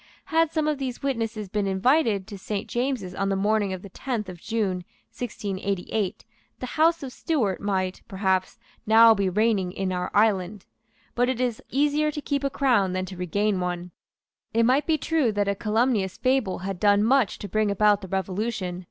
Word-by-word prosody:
Had 325 -1 +3
some 315 -2 0
of 300 -2 0
these 260 -2 -4
witnesses 225 -6 -2
been 200 +1 -1
invited 205 +1 +2
to 205 - -9
Saint 205 +1 -4
James's 240 -7 -2
on 195 +1 -1
the 195 - +1
morning 205 0 +1
of 185 -1 -5
the 200 - -9
tenth 220 -1 -4
of 175 -2 -10
June 215 -5 -1 0.4
1688, 200 -3 -3 0.3
the - - -5
House 320 +5 +2
of 260 -2 -6
Stuart 230 - -1
might, 190 -2 -1
perhaps, 190 0 0 0.3
now 225 +1 +8
be 200 -3 0
reigning 205 -2 +1
in 190 0 -2
our 180 0 -2
island. 200 -2 +2 0.5
But 245 +1 +1
it 260 -2 -1
is 245 -3 -1
easier 295 +2 +2
to 300 - -4
keep 285 -1 -2
a 275 - +1
crown 240 -10 +2
than 185 0 -1
to 185 - -8
regain 195 +3 0
one. 180 0 -3 0.6
It 230 - +4
might 260 +5 +2
be 320 -1 +3
true 300 -5 +1
that 205 -1 0
a 200 - +2
calumnious 215 -1 0
fable 255 -7 +1
had 190 -1 -4
done 205 0 +4
much 255 -1 +3
to 205 - -7
bring 215 +2 +1
about 205 0 +3
the 190 - -7
Revolution. 190 0 -2
210 Hz, 185 wpm, -25 LUFS, 190-250 Hz, 0.6 s, now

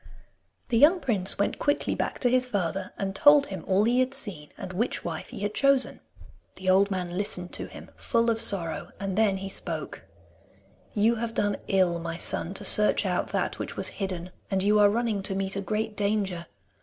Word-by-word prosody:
The 230 -3 +2
young 330 +7 +6
prince 205 - 0
went 200 - -1
quickly 290 - 0
back - - -2
to 245 - +3
his 255 0 +2
father, 195 -5 -2
and 195 -1 -3
told 290 +5 +6
him 190 -8 -7
all 195 +1 +3
he 240 +3 +2
had 255 +1 +1
seen 190 - -3
and 185 - -7
which 230 +7 -2
wife 165 -2 -5
he - - -8
had 205 0 -2
chosen. 275 0 +2 0.6
The 185 0 0
old 195 +2 +4
man 180 -3 -3
listened 180 -2 -1
to - - -3
him - - -12
full 230 -1 +1
of 225 0 -1
sorrow, 175 -5 +1
and 195 -2 -3
then 210 -2 +3
he 195 0 -6
spoke: 195 - -5 0.9
'You 225 +3 +3
have 230 0 -4
done 205 -1 0
ill, 185 -3 +2
my 165 0 -5
son, 175 +2 0
to 205 - -6
search 210 +2 +3
out - - 0
that - - -2
which - - -5
was - - +2
hidden, 180 -2 -4 0.2
and 190 -1 0
you 210 +1 +4
are 205 -1 +6
running 225 -2 -1
to 195 0 -1
meet 195 0 -2
a 200 - -2
great 215 +2 -2
danger. 200 -5 -1
200 Hz, 205 wpm, -27 LUFS, 185-230 Hz, 0.9 s, young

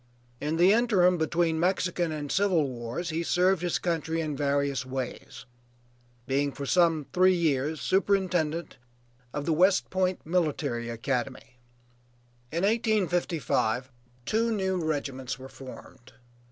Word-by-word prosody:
In 150 +2 -2
the 180 +4 +6
interim 190 -7 +3
between 165 +1 +1
the - - -2
Mexican 180 -1 0
and 150 -2 -4
Civil 185 -7 +2
wars 125 +7 -5
he 160 +1 -1
served 180 +1 +2
his 175 -1 0
country 165 -1 -2
in 155 -3 -2
various 140 -1 0
ways, 130 0 -6 0.8
being 140 +1 0
for 140 - -6
some 165 -1 +3
three 185 +1 +5
years 155 -2 0
superintendent 180 -4 0 0.5
of 145 +1 -4
the 165 - +1
West 185 +4 +3
Point 185 -1 0
Military 150 -8 -1
Academy. 125 +1 -4 0.9
In 170 +3 -1
1855 180 - 0 0.3
two 230 +2 +1
new 190 -4 0
regiments 135 -4 -3
were 130 0 -10
formed. 130 -1 -12
160 Hz, 125 wpm, -28 LUFS, 140-180 Hz, 0.9 s, the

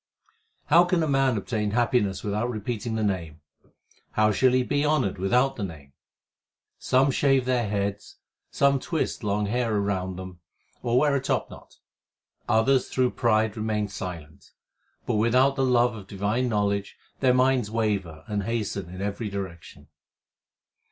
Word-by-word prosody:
How 170 +3 +6
can 180 -1 +1
man 135 -3 +2
obtain 105 +1 -2
happiness 110 -3 +1
without 105 +3 -1
repeating 110 0 -3
the 110 - -1
Name? 85 -6 -2 0.7
How 110 0 +3
shall 130 +4 +3
he 130 0 +3
be 145 +3 0
honoured 140 -11 +1
without 125 +8 +2
the 105 - -3
Name? 75 -7 -8 0.9
Some 135 +2 +3
shave 135 -1 +2
their 125 -4 0
heads, 100 0 -3 0.3
some 140 -1 +2
twist 160 -3 -3
long 105 0 0
hair 115 0 0
round 95 -2 -2
them 95 -1 -9 0.4
or 120 0 +1
wear 145 +1 +3
a 135 - 0
top - - -1
knot; - - -14 0.7
others 125 +4 +3
through 130 -1 +1
pride 110 -2 +1
remain 110 -1 -1
silent; 90 -7 -8 0.5
But - - 0
without 125 +5 +3
the 135 - 0
love 125 -2 +3
of 100 -3 -10
divine 105 +6 -1
knowledge 100 -2 -1 0.2
their 130 -2 +3
minds 130 -3 +2
waver 100 -8 -2
and 105 -2 -2
hasten 105 -5 -3
in 90 +2 -6
every 105 +2 -3
direction. 95 -4 -8
110 Hz, 150 wpm, -26 LUFS, 100-125 Hz, 0.9 s, How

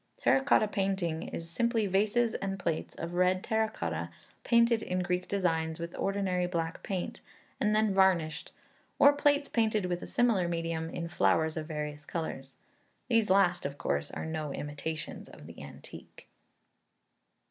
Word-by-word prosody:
Terra - - +3
Cotta 270 -5 +4
painting 190 -5 -1
is 165 - -6
simply 225 +6 +1
vases 215 +4 +2
and 195 0 -3
plates 170 -4 -3
of 165 +1 -5
red 185 +1 +2
terra 220 0 +1
cotta, - - -3 0.3
painted 235 -1 +4
in 180 -2 -1
Greek 180 0 -1
designs 160 -5 0
with 170 0 -5
ordinary 190 -2 0
black 165 -1 -3
paint, 185 -3 -4 0.4
and 210 0 +2
then 215 -2 +3
varnished, 175 -5 +2 0.5
or 285 - +7
plates 285 0 +2
painted 220 -5 +1
with 175 -1 -2
a - - -7
similar 225 -8 +2
medium, 165 -1 -2
in 170 0 -4
flowers 160 -2 +2
of 155 -2 -4
various 150 -2 -5
colours. 135 -5 -5 0.5
These 230 -4 +3
last, 185 -2 +4
of 140 0 -4
course, 70 - -1
are - - -5
no 155 -2 -3
imitations 150 +2 -5
of - - -13
the - - -11
antique. - - -12
180 Hz, 155 wpm, -30 LUFS, 160-210 Hz, 0.5 s, or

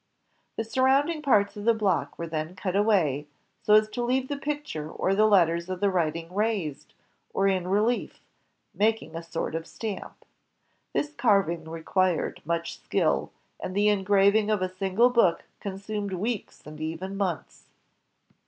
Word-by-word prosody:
The 225 - -2
surroimding 265 +7 +2
parts 210 -8 +3
of 205 0 -7
the 230 0 +4
block 185 -10 0
were 170 - -4
then 160 +1 -4
cut 185 -1 -3
away, 175 -9 +2 0.3
so 210 - +5
as 215 0 +5
to 245 - -4
leave 255 +2 0
the 285 - -1
picture 280 - -4
and 195 - +2
the 215 - +6
letters 170 -4 +3
of 185 -1 -3
the 200 0 +2
writing 165 -1 -1
raised, 205 -8 -2 0.4
or 195 - +3
in 190 -2 +1
reUef, 210 +6 +1 0.6
making 220 -3 0
a 165 - -4
sort 165 -1 -4
of 165 0 -4
stamp. 215 -4 -7 0.7
This 295 0 -1
carving 195 - +1
required 170 +2 0
much 170 +1 -2
skill, - - 0 0.3
and 185 - -5
the 205 +1 +4
engraving 200 +1 +3
of 210 -3 +1
a 185 0 -4
single 195 +6 +3
book 210 -9 +3 0.2
consumed 200 0 -4
weeks 210 +4 -4
and 155 0 -10
even 165 +5 -4
months. 190 -5 -4
195 Hz, 155 wpm, -27 LUFS, 170-220 Hz, 0.7 s, the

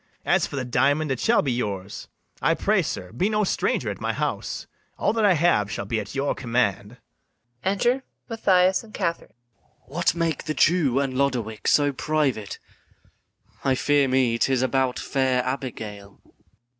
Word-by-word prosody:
As - - +2
for - - -8
the 130 -2 -2
diamond, 140 +5 +1
it 130 - -1
shall 235 - +3
be 135 - 0
yours: 100 -5 -4 0.3
I - - +3
pray, - - +2
sir, 90 0 -5
be 180 - 0
no 215 -1 +1
stranger 190 - 0
at - - -9
my - - -1
house; - - -3 0.3
All - - +1
that 225 -1 0
I 200 - +6
have 155 - +2
shall 100 - -4
be 110 +2 -1
at 105 +4 -7
your 140 +1 0
command. 115 -2 -1 0.7
Enter 240 +7 +1 0.3
MATHIAS 190 -5 +3
and 215 -2 -13
KATHARINE. 170 -8 -2
MATHIAS. 120 0 -36
What - - +2
make 165 -2 -1
the 155 - -2
Jew 150 -7 +3
and 135 -2 -1
Lodowick 125 -5 -1
so 145 -1 +3
private? 130 -9 -1 1.1
I 135 -1 +2
fear 145 +1 +2
me 130 -3 +2
'tis 130 0 +2
about 130 0 +1
fair 130 -2 0
Abigail. 110 -7 -6
135 Hz, 165 wpm, -24 LUFS, 120-155 Hz, 1.1 s, I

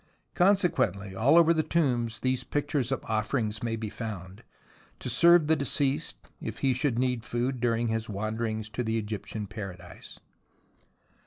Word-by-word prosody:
Consequently, 175 - +2
all 135 - +4
over 170 0 +6
the 160 - +2
tombs, 125 -8 0
these 130 -1 +1
pictures 145 -2 -1
of 135 - -2
offerings 110 0 -1
may 115 -1 -1
be 110 -1 -4
found, 95 -4 -7 0.5
to - - -4
serve 170 -1 +6
the 160 +1 +3
deceased 140 +1 0
if 110 0 -5
he 130 - +4
should 130 -1 0
need 125 -2 0
food 120 +2 -2
during 115 -1 +1
his 110 0 -2
wanderings 110 +1 -3
to 115 +3 -3
the 110 0 -1
Egyptian 105 0 -4
Paradise. 95 -5 -8
115 Hz, 150 wpm, -28 LUFS, 110-140 Hz, 0.5 s, over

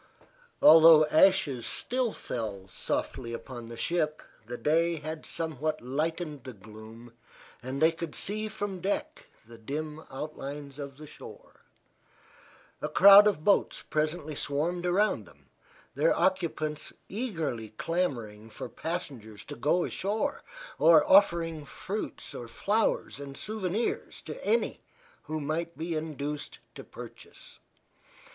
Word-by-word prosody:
Although 160 -1 +9
ashes 160 -8 +4
still 250 -2 -1
fell 105 - -5
softly 115 +5 -3
upon 120 0 -7
the 115 - -8
ship 155 0 -1 0.2
the 120 +1 -5
day 165 +4 +2
had 155 0 -6
somewhat 155 -1 -2
lightened 150 +2 -3
the 130 - -8
gloom 110 +3 -13 0.5
and 130 +2 -4
they 160 +1 +5
could 165 -1 -6
see 215 +2 -3
from 205 -3 -4
deck 295 - -3 0.2
the 115 0 -14
dim 150 +6 -5
outlines 140 0 -7
of 140 -2 -7
the 155 - -10
shore. - - -13 1.2
A - - -2
crowd 200 +2 +9
of 190 -7 0
boats 200 +2 +2
presently 155 0 -1
swarmed 165 +6 -1
around 200 +4 +1
them, - - -21 0.4
their - - +2
occupants 165 -5 0 0.2
eagerly 165 - -3
clamoring 115 -7 -3
for - - -7
passengers 130 -11 -5
to - - -8
go 155 +8 +2
ashore, 205 +3 -2 0.4
or 160 -1 +7
offering 170 -5 +4
fruits, 195 +8 -6
flowers 205 - 0
and 140 -1 -8
souvenirs 215 0 -2
to - - -8
any 465 - +1 0.4
who 155 0 -3
might 165 +3 -3
be 165 +2 -3
induced 150 -2 -4 0.2
to - - -9
purchase. - - -12
155 Hz, 125 wpm, -29 LUFS, 135-180 Hz, 1.2 s, Although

